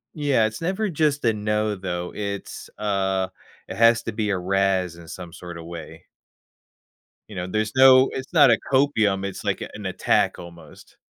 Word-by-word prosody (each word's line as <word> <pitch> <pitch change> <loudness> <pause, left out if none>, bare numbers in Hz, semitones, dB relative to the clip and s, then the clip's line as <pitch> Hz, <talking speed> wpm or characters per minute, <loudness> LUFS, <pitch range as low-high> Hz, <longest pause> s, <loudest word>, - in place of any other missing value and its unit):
yeah, 140 -7 +2
it's 110 +8 -8
never 190 +5 -1
just 150 -3 0
a 115 - +3
"no," 105 0 -1
though. 90 -2 -4
It's, 100 -1 -6
uh 95 -2 0 0.4
it - - -7
has 115 0 +5
to 115 - -4
be 105 -1 -2
a 95 - 0
razz 95 -1 0
in 85 -1 -13
some 85 0 -9
sort 90 -1 -9
of 80 - -10
way. 80 -1 -10 1.2
You 100 - -10
know, 90 0 -3
there's 110 +3 -2
no 130 0 +7
it's 135 +5 -6
not 145 -6 +6
a 115 - +4
copium, 110 -8 +2
it's, 100 - -7
like, - - -1
a - - -5
an - - -8
attack - - +1
almost. 85 -1 -14
105 Hz, 185 wpm, -23 LUFS, 90-125 Hz, 1.2 s, no